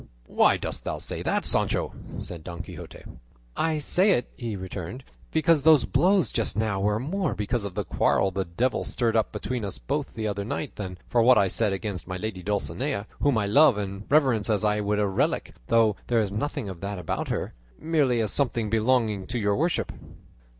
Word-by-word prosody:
"Why -, -, +4 dB
dost -, -, -5 dB
thou -, -, -3 dB
say -, -, -5 dB
that, -, -, 0 dB
Sancho?" -, -, 0 dB, 0.3 s
said 85 Hz, -3 st, -7 dB
Don 85 Hz, -1 st, -6 dB
Quixote. -, -, -10 dB, 0.5 s
"I 160 Hz, -1 st, +1 dB
say 185 Hz, +6 st, +3 dB
it," 120 Hz, -, -1 dB
he 115 Hz, -4 st, -4 dB
returned, 95 Hz, +5 st, -6 dB, 0.3 s
"because 160 Hz, -1 st, +3 dB
those 155 Hz, -2 st, +6 dB
blows 180 Hz, -, +3 dB
just -, -, -1 dB
now 110 Hz, -3 st, 0 dB
were 105 Hz, +2 st, +1 dB
more 155 Hz, -, -1 dB
because 105 Hz, +1 st, -1 dB
of 95 Hz, -3 st, -6 dB
the -, -, -1 dB
quarrel 95 Hz, -, +2 dB
the 95 Hz, +1 st, -1 dB
devil 115 Hz, +10 st, -1 dB
stirred 115 Hz, -2 st, 0 dB
up 110 Hz, -, +2 dB
between 125 Hz, -3 st, -3 dB
us 100 Hz, -, -4 dB
both 145 Hz, +1 st, -3 dB
the 110 Hz, -1 st, -2 dB
other 100 Hz, -1 st, -2 dB
night, 125 Hz, +7 st, -4 dB
than 95 Hz, -3 st, -6 dB
for 120 Hz, -, +2 dB
what 125 Hz, +1 st, +6 dB
I 100 Hz, -, +4 dB
said 105 Hz, +2 st, +1 dB
against 95 Hz, -2 st, -4 dB
my 90 Hz, -1 st, -4 dB
lady 105 Hz, -2 st, -4 dB
Dulcinea, 100 Hz, -, -2 dB
whom 145 Hz, -5 st, +2 dB
I 105 Hz, -, +1 dB
love 130 Hz, +3 st, +5 dB
and 100 Hz, 0 st, -5 dB
reverence 130 Hz, -8 st, +3 dB
as 105 Hz, -2 st, +1 dB
I 105 Hz, 0 st, +2 dB
would 105 Hz, 0 st, 0 dB
a 105 Hz, -, +2 dB
relic 95 Hz, -1 st, 0 dB
though 110 Hz, -3 st, +4 dB
there 120 Hz, -2 st, +2 dB
is 105 Hz, -3 st, 0 dB
nothing 130 Hz, +3 st, -3 dB
of 90 Hz, -3 st, -7 dB
that 100 Hz, 0 st, -4 dB
about 90 Hz, -3 st, -3 dB
her -, -, -3 dB, 0.3 s
merely 145 Hz, -7 st, +2 dB
as 110 Hz, -, 0 dB
something 120 Hz, -6 st, 0 dB
belonging 110 Hz, -3 st, +1 dB
to 125 Hz, -, -3 dB
your 105 Hz, -3 st, +1 dB
worship." 165 Hz, +4 st, 0 dB
110 Hz, 200 wpm, -26 LUFS, 100-130 Hz, 0.5 s, those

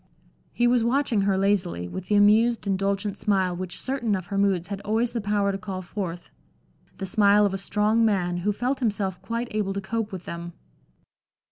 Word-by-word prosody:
He 240 Hz, -, +1 dB
was 240 Hz, -1 st, +3 dB
watching 240 Hz, -3 st, +1 dB
her 190 Hz, -, +2 dB
lazily, 190 Hz, -, 0 dB
with 185 Hz, -, -7 dB
the 210 Hz, -, +2 dB
amused, 220 Hz, +3 st, +4 dB
indulgent 200 Hz, +1 st, -1 dB
smile 190 Hz, -3 st, +1 dB
which 180 Hz, 0 st, -5 dB
certain 250 Hz, -6 st, -1 dB
of 185 Hz, -2 st, -4 dB
her -, -, 0 dB
moods 190 Hz, -3 st, +1 dB
had 200 Hz, -1 st, -4 dB
always 225 Hz, +3 st, 0 dB
the 235 Hz, -, -2 dB
power 205 Hz, -1 st, +1 dB
to 195 Hz, -, -4 dB
call 190 Hz, -2 st, -5 dB
forth; 175 Hz, -2 st, -6 dB, 0.7 s
the 195 Hz, -, -4 dB
smile 205 Hz, +1 st, +4 dB
of 200 Hz, -, 0 dB
a 195 Hz, -, -2 dB
strong 210 Hz, +3 st, +1 dB
man, 180 Hz, -5 st, +1 dB
who 190 Hz, +4 st, 0 dB
felt 250 Hz, +6 st, -1 dB
himself 200 Hz, -6 st, -1 dB
quite 230 Hz, +4 st, -3 dB
able 210 Hz, -2 st, -1 dB
to 200 Hz, -, -2 dB
cope 220 Hz, +2 st, -3 dB
with 185 Hz, -2 st, -7 dB
them. 170 Hz, 0 st, -6 dB
200 Hz, 195 wpm, -25 LUFS, 190-220 Hz, 0.7 s, amused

